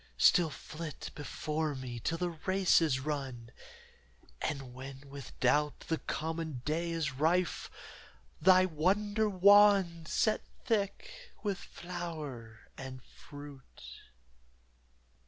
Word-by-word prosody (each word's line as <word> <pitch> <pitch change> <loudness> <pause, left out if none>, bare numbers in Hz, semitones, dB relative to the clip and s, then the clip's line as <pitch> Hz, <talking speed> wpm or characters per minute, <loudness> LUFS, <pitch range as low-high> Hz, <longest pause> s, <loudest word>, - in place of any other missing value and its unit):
Still 175 -3 +5
flit 155 +1 -7
before 150 +1 -3
me 125 -2 -6
till 165 +8 -1
the 175 0 -1
race 185 +3 +3
is 150 -5 +2
run, 130 -5 -4 0.9
And 135 -4 -3
when 135 +2 -9
with 140 -2 -10
doubt 150 0 +2
the 160 - -2
common 160 -5 -4
day 165 +3 0
is 160 -3 -1
rife, 165 +6 +1 0.7
Thy 185 +2 +7
wonder 205 +6 +1
wand 195 -3 +5
set 215 +6 +2 0.2
thick 475 - -2
with 200 -4 -1
flower 155 -11 -7
and 130 -1 -8
fruit. 140 - -12
160 Hz, 105 wpm, -32 LUFS, 140-185 Hz, 0.9 s, Thy